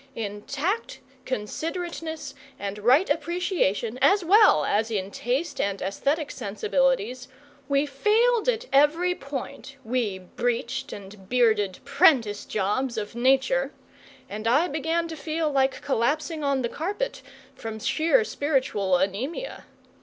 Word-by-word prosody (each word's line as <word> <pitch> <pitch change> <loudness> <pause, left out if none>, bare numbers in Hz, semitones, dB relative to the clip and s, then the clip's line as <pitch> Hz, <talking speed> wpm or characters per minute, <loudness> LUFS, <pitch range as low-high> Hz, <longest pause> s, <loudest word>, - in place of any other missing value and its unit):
In 205 -2 -4
tact, 340 - -2 0.3
considerateness, 320 - -4 0.2
and 200 +1 -5
right 255 - +4
appreciation, 315 - 0
as 380 +7 +4
well 395 - +6
as 220 +2 +1
in 200 -3 -2
taste 260 +11 -2
and 200 -1 -1
aesthetic 280 - -1
sensibilities 250 +3 0 0.4
we 280 +1 +3
failed 435 - +2
at 475 0 0
every 315 +6 +4
point, 275 -3 -7
we 225 -5 -1
breeched 235 +6 -3
and 195 -1 -11
bearded 220 -6 +2
prentice 220 -8 +3
jobs 220 +5 -1
of 205 -1 -4
Nature; 265 +2 +2 0.6
and 215 +2 -5
I 285 +9 +4
began 325 +3 -1
to 325 - -6
feel 315 0 -2
like 270 -1 +1
collapsing 295 +5 0
on 275 -2 +1
the 235 - -1
carpet 410 - -3 0.3
from 225 -4 -6
sheer 330 - +2
spiritual 260 - 0
anaemia. 250 - -3
270 Hz, 125 wpm, -25 LUFS, 215-320 Hz, 0.6 s, well